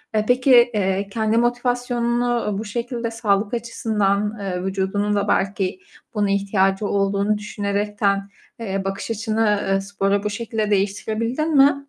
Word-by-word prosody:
Eee, 215 0 +2
peki, 255 +2 +3 0.2
eee, 195 -1 0
kendi 220 +1 0
motivasyonunu, 240 0 0
uuu, 200 -2 -1
bu 220 - -4
şekilde 235 +1 -3
sağlık 210 -1 0
açısından, 215 -3 0
eee, 185 -2 -3
vücudunun 195 +2 -1
da 200 0 0
belki 195 - 0 0.4
buna 205 -1 +1
ihtiyacı 195 0 +1
olduğunu 200 +1 +1
düşünerekten, 200 -1 -1 0.3
eee, 195 -3 -3
bakış 195 +3 -3
açını, 220 -1 +1
eee, 195 0 +2
sporu 200 0 -1
bu 210 - -1
şekilde 220 -1 -2
değiştirebildin 225 +9 0
mi? 280 +1 +6
210 Hz, 135 wpm, -22 LUFS, 200-230 Hz, 0.4 s, mi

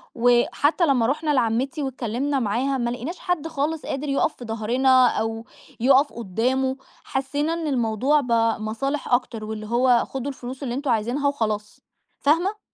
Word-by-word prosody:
وحتى 245 +7 +3
لمَّا 255 -6 +3
رُحنا 300 +4 0
لعمِّتي 260 +4 0
واتكلَّمنا 265 +2 -2
معاها، 255 +5 0
ما 240 -2 -1
لقِيناش 250 +9 -5
حد 340 -3 -2
خالص 315 0 -2
قادر 280 +2 -3
يقف 275 +3 +1
في 245 - -9
ضهرنا 250 +4 +3
أو 225 0 -2 0.3
يقف 270 +4 +4
قُدَّامه، 250 +5 -1 0.3
حسّينا 285 +4 -2
إن 330 -2 -3
الموضوع 255 +3 +2
بقى 230 -3 +1
مصالح 275 +7 -3
أكتر، 240 -3 0
واللي 215 0 -6
هو: 240 +1 +3
"خُدوا 270 +1 -4
الفلوس 260 +1 -8
اللي 240 -3 -3
أنتم 275 -1 -1
عايزِينها 240 +6 0
وخلاص." 215 -6 -2 0.4
فاهِمة؟ 350 +9 +1
260 Hz, 150 wpm, -23 LUFS, 230-285 Hz, 0.4 s, يقف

